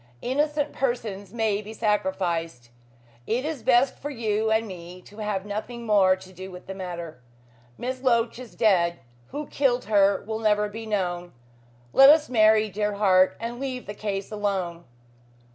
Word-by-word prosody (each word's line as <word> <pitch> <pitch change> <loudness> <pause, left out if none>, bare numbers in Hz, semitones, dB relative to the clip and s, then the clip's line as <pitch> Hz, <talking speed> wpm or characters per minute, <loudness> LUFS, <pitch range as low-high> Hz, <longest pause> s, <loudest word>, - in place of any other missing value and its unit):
Innocent 295 +3 0
persons 220 -7 -3
may 220 -3 0
be 215 +1 -9
sacrificed. 175 - -1 0.6
It 245 +5 0
is 310 -5 -3
best 255 +2 +3
for 290 - -5
you 220 -4 -1
and 220 +1 +1
me 180 -1 -9
to 210 - -14
have 205 -2 -2
nothing 225 +3 -5
more 195 -4 +4
to 185 0 -14
do 185 +1 -8
with 180 -1 -11
the 190 - -6
matter. 170 -6 -7 0.6
Miss 255 +1 -4
Loach 235 -2 +1
is 250 -2 -11
dead. 175 -6 +3 0.3
Who 295 - -5
killed 265 -4 0
her 200 -2 +3
will 220 +1 -3
never 210 -1 +2
be 225 +2 -8
known. 175 -4 -2 0.6
Let 270 +1 +9
us 300 0 +5
marry, 220 -2 +5
dear 210 0 -2
heart, 190 -2 +4
and 235 +1 -5
leave 260 -2 -4
the 205 - -6
case 200 -1 -4
alone." 190 -5 -2
210 Hz, 160 wpm, -25 LUFS, 190-235 Hz, 0.6 s, Let